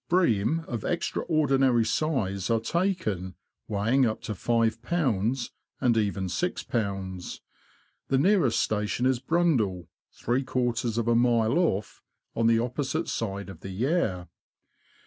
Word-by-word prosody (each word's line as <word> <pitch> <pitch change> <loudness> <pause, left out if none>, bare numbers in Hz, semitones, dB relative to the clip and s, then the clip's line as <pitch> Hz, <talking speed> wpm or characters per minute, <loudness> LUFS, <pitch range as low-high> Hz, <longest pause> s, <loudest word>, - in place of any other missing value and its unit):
Bream 160 - +2
of 120 -4 -4
extraordinary 135 -8 +1
size 110 - -1
are 115 -1 +3
taken, 110 - -1 0.3
weighing 110 +6 +2
up 110 -3 0
to - - -4
5lbs. 115 - 0 0.3
and 125 -3 +2
even 100 -3 0
61bs. 95 - -3 0.7
The 135 - +2
nearest 165 - +3
station 105 +3 0
is 130 -2 +2
Brundall, 125 - +1 0.2
three 125 +3 -1
quarters 120 -3 -1
of 115 -1 0
a 120 - +4
mile 120 +3 +3
off, 105 - -1 0.3
on 115 0 +2
the 115 0 +4
opposite 125 +3 -2
side 100 -3 -3
of 95 -5 -10
the 95 - -8
Yare. 100 - -1
115 Hz, 125 wpm, -27 LUFS, 105-135 Hz, 0.7 s, a